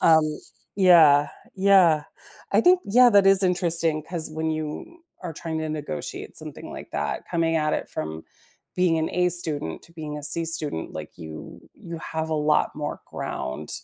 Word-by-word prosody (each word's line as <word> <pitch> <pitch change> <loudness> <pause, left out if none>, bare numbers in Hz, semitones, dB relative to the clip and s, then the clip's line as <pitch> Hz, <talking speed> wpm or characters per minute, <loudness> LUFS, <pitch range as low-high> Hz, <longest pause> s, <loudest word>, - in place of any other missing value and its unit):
Um. 160 -1 +5 0.5
Yeah. 160 -7 +6 0.3
Yeah. 185 -5 +5 0.5
I - - +5
think, 360 0 +5
yeah, 245 +5 +6
that 200 -2 +5
is 195 0 +5
interesting 170 -3 +1
‘cause 165 -1 -4
when 160 +1 -2
you 155 - -5 0.2
are 175 -2 -5
trying 160 +1 -5
to 155 - -3
negotiate 150 - -5
something - - -9
like - - -9
that, - - -2
coming 165 -1 +1
at 155 -1 +1
it - - -3
from 80 +1 -5 0.5
being 180 -3 +2
an 160 - 0
A 180 0 +2
student 155 - -3
to 170 - -18
being 155 -2 -6
a - - -9
C 165 +2 -1
student, 155 - -3
like, 80 0 -7
you 80 -2 -9
you 170 -1 -8
have 160 0 -4
a 160 - -1
lot 150 0 +1
more 150 0 -5
ground 65 0 -5
160 Hz, 175 wpm, -24 LUFS, 150-175 Hz, 0.5 s, Yeah